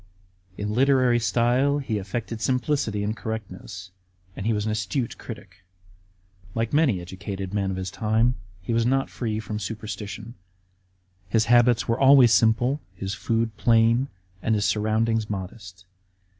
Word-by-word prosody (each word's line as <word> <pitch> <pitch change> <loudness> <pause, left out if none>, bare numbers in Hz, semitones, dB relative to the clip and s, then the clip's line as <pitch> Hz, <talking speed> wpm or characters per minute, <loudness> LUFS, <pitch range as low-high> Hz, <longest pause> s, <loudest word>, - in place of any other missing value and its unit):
In 105 +1 -3
literary 130 -1 +4
style 125 +5 +2
he 120 -7 -2
affected 110 +3 -5
simplicity 125 -5 0
and 105 +2 -1
correctness; 100 -4 -7 0.4
and 100 - -4
he - - +3
was 105 -1 -1
an 110 - 0
acute 110 +4 -2
critic. 95 -6 -10 1.0
Like 115 +2 -1
many 145 - +3
educated 95 +2 -6
men 100 -2 0
of 95 - -3
his 95 -1 -4
time, 110 +4 +2 0.3
he 115 - -2
was 115 0 +2
not 135 +3 +1
free 110 -3 -3
from 110 -1 -5
superstition. 105 +1 -6 1.0
His 110 +2 +2
habits 120 0 +4
were 115 0 0
always 135 -4 +7
simple, 120 +6 +3
his 95 +2 -4
food 115 -1 -1
plain, 115 +3 +3 0.3
and 110 - +1
his 105 -1 +1
surroundings 110 +2 +1
modest. 95 -2 -7
110 Hz, 145 wpm, -25 LUFS, 105-120 Hz, 1.0 s, always